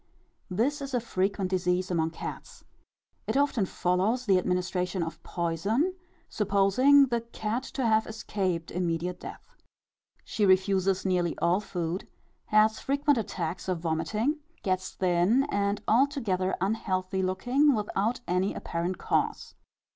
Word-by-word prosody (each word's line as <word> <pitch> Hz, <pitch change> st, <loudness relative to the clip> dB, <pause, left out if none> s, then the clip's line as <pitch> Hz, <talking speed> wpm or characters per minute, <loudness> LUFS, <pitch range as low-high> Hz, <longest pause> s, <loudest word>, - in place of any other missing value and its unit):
_ -, -, -42 dB, 0.5 s
This 285 Hz, +6 st, +1 dB
is 275 Hz, -2 st, -4 dB
a -, -, +3 dB
frequent 195 Hz, -3 st, -1 dB
disease 180 Hz, 0 st, 0 dB
among 165 Hz, -2 st, +1 dB
cats. 160 Hz, -, -8 dB, 0.6 s
It -, -, 0 dB
often 275 Hz, -8 st, +2 dB
follows 195 Hz, +10 st, 0 dB
the 190 Hz, -4 st, +4 dB
administration 180 Hz, 0 st, -1 dB
of 165 Hz, -, -6 dB
poison 195 Hz, -, -1 dB, 0.3 s
supposing 210 Hz, +8 st, +4 dB
the 235 Hz, -3 st, -1 dB
cat 230 Hz, 0 st, -3 dB
to 265 Hz, -, 0 dB
have 220 Hz, -1 st, +3 dB
escaped 190 Hz, -6 st, -3 dB
immediate 175 Hz, 0 st, -2 dB
death. -, -, -10 dB, 0.7 s
She 215 Hz, -, -2 dB
refuses 190 Hz, 0 st, +3 dB
nearly 180 Hz, -3 st, 0 dB
all 175 Hz, +3 st, +2 dB
food, 175 Hz, -3 st, -4 dB, 0.4 s
has 215 Hz, +1 st, +3 dB
frequent 280 Hz, -1 st, +1 dB
attacks 185 Hz, -4 st, -4 dB
of 180 Hz, -3 st, -1 dB
vomiting, 210 Hz, -, -1 dB, 0.2 s
gets 185 Hz, -1 st, -1 dB
thin 185 Hz, +8 st, +2 dB
and 200 Hz, +1 st, 0 dB
altogether 230 Hz, -7 st, +1 dB
unhealthy 190 Hz, -1 st, -1 dB
looking, 245 Hz, +10 st, +2 dB
without 215 Hz, +3 st, -1 dB
any 185 Hz, +2 st, 0 dB
apparent 175 Hz, +2 st, -3 dB
cause. -, -, -1 dB
195 Hz, 130 wpm, -28 LUFS, 180-225 Hz, 0.7 s, the